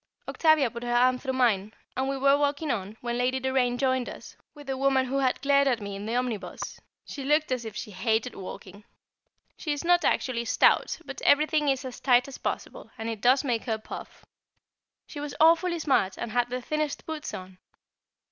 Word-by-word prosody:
Octavia 315 -7 +3
put 235 - -7
her 240 0 -1
arm 250 +1 +4
through 265 - -3
mine, 215 -6 +2 0.2
and 265 +1 -1
we 275 - -1
were 275 +1 +4
walking 285 +1 0
on, 205 0 -4
when 240 0 -2
Lady 255 +1 +1
Doraine 260 -2 +1
joined 260 -1 0
us, - - -11 0.2
with 290 -1 -12
the 270 -1 -2
woman 265 0 +2
who 270 +2 -1
had 260 -2 +1
glared 280 0 +4
at 250 -4 +2
me 200 -1 -6
in 200 +2 -6
the 230 - -2
omnibus. 230 -7 -3 0.3
She 280 - -7
looked 300 +1 +2
as 250 -2 -1
if 220 -2 -7
she 215 - -6
hated 220 +4 0
walking. 195 +1 -9 0.7
She 310 - -3
is 290 - -5
not 350 +1 +4
actually 235 -2 0
stout, - - +3
but - - -8
everything 300 0 +3
is 270 0 0
as 255 -1 -7
tight 250 -1 +4
as 275 - -9
possible, - - -5
and 225 0 -4
it 220 -3 -5
does 255 +4 +4
make 240 -5 -1
her 225 -2 -1
puff. 215 - -10 0.8
She 295 - -9
was 290 -2 -5
awfully 335 +2 +4
smart, 260 - +1
and 235 - -5
had 245 0 +1
the 250 0 -4
thinnest 305 0 -2
boots 315 -1 -5
on. 185 0 -10
255 Hz, 205 wpm, -27 LUFS, 235-280 Hz, 0.8 s, arm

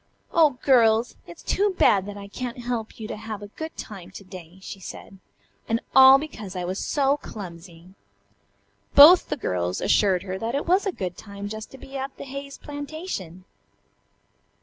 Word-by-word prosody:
"Oh, 305 -6 +4
girls! 230 -3 +4
It's 170 - -12
too 400 -1 +1
bad 195 -1 +4
that 205 0 -7
I 200 0 -8
can't 245 +4 -6
help 235 -2 -4
you 220 - -6
to - - -5
have 215 -1 -7
a 205 - -9
good 315 +9 -8
time 190 -4 -8
to 195 - -11
day," 185 -2 -12
she 195 - -8
said, 195 +1 -10 0.5
"and 225 +1 +1
all 265 0 +9
because 220 -10 -7
I 180 - -3
was 185 +2 -3
so 280 0 +1
clumsy." 175 - -10 1.0
Both 325 +6 +9
the 295 - -2
girls 90 - -2
assured 190 -4 +2
her 190 -1 -5
that 230 +4 -2
it 285 - -1
was 375 +4 +2
a - - +1
good 180 - -5
time 200 -1 -8
just 220 +1 -7
to - - -10
be 270 +1 -9
at 270 0 -5
the - - -7
Hayes 275 +1 -8
plantation. 285 - -7
220 Hz, 180 wpm, -24 LUFS, 190-275 Hz, 1.0 s, all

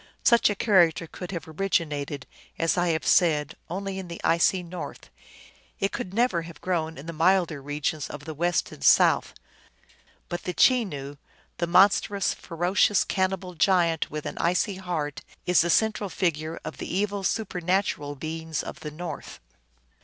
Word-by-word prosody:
Such 235 -2 +5
a 205 - -1
character 175 -6 +3
could 180 +2 -8
have 170 -4 -5
originated, 150 -5 -2 0.3
as 165 0 +1
I 175 -1 +1
have 160 -2 0
said, 150 -5 +3 0.2
only 195 +2 -4
in 190 - -7
the 170 -1 -7
icy 180 +2 +3
north; 175 +1 -8 0.7
it 195 0 0
could 180 - -5
never 220 -5 +1
have 165 -1 -11
grown 165 -3 -2
in 140 - -9
the 165 - -5
milder 165 -2 +2
regions 145 +1 -3
of 145 -1 -8
the 160 - -5
west 175 +3 0
and 70 - -11
south. - - +4 0.9
But 175 - -4
the 180 - -4
Chenoo, 145 - +2 0.4
the 170 - 0
monstrous, 195 +2 +4
fero 175 +2 -3
cious 205 0 +4
cannibal 185 -1 -1
giant, 170 -2 +2
with 150 0 -5
an - - -5
icy 180 +3 +1
heart, 165 -6 -3 0.2
is 180 -1 +4
the 170 - 0
central 215 +1 +2
figure 160 -3 -2
of - - -6
the - - -6
evil 200 +1 -1
supernatural 180 -7 -1
beings 160 +2 -4
of - - -8
the 150 - -6
north. 155 0 -7
175 Hz, 160 wpm, -26 LUFS, 160-190 Hz, 0.9 s, Such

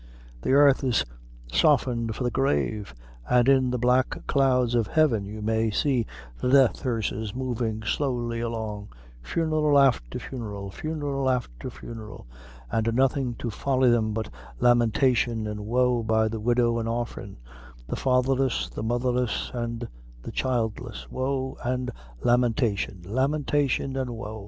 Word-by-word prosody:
The - - -3
airth 140 0 +5
is 125 -3 +2 0.5
softened 120 -6 +2
for 130 - -3
the 120 - 0
grave, 75 - 0 0.3
an' 125 -1 +4
in 130 -1 +4
the 125 - -1
black 125 +2 +1
clouds 125 -3 +2
of 115 -3 +2
heaven 125 -10 +2
you 105 +1 -7
may 110 +1 +1
see 120 +1 +1 0.3
the 125 - +1
death 135 -2 +4
hearses 110 -4 -2
movin' 120 -4 -2
slowly 120 -2 -1
along 110 -3 -4 0.3
funeral 155 - +1
afther 120 - +3
funeral 105 -6 -6
funeral 145 0 -2
afther 120 - -2
funeral 110 - -9 0.5
an' 110 - +1
nothing 130 0 +1
to 115 +1 -4
folly 130 +1 +2
them 110 -2 +2
but 110 0 -3 0.3
lamentation 120 - +3
an' 105 0 -5
wo, 125 0 +2
by 110 0 +2
the 110 0 -4
widow 120 +1 +2
an' 115 - -3
orphan 120 +1 -4 0.5
the - - -4
fatherless, 130 0 +1
the - - -6
motherless, 120 +1 -1
an' 120 -1 -3 0.4
the - - -6
childless 120 -2 -2
wo 130 0 -2
an' 125 +1 -1 0.3
lamentation 115 -6 +1
lamentation 135 +3 0
an' 130 -2 -2
wo." 110 -2 -6
120 Hz, 135 wpm, -26 LUFS, 110-130 Hz, 0.5 s, airth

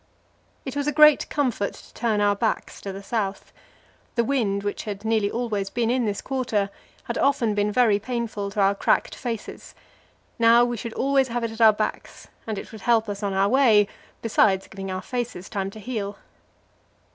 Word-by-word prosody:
It 265 0 -5
was 285 0 -1
a - - +2
great 300 0 +6
comfort 250 -8 -1
to - - -16
turn 220 -3 0
our 205 0 +3
backs 220 +2 -2
to 195 - -5
the 195 +1 -8
south. 200 -2 -3 0.6
The 235 - +3
wind, 220 -6 0
which 205 +2 -3
had 205 0 -6
nearly 220 -2 +2
always 215 -5 -2
been 235 +2 0
in 250 -1 +1
this 205 -2 -2
quarter, 235 -7 -1 0.3
had - - -4
often 275 -6 +2
been 205 0 +1
very 215 -3 +3
painful 225 -3 -3
to 205 +1 -1
our 195 0 +4
cracked 200 - +1
faces; 230 -4 -6 0.6
now 230 +1 +6
we 240 0 -2
should 230 +1 -6
always 270 0 +2
have 240 0 -3
it 230 - -2
at 225 +1 -7
our 220 -1 +9
backs, 215 +1 -5 0.2
and 215 -2 -3
it - - -7
would 220 -3 -10
help 230 -1 +2
us 200 0 -5
on 200 -1 -1
our 195 +1 +3
way, 225 -4 +5 0.4
besides 205 -4 +3
giving 195 0 -7
our 185 0 -4
faces 240 -7 -4
time 195 -3 -2
to 215 - -11
heal. 205 -3 -4
220 Hz, 190 wpm, -24 LUFS, 200-240 Hz, 0.6 s, our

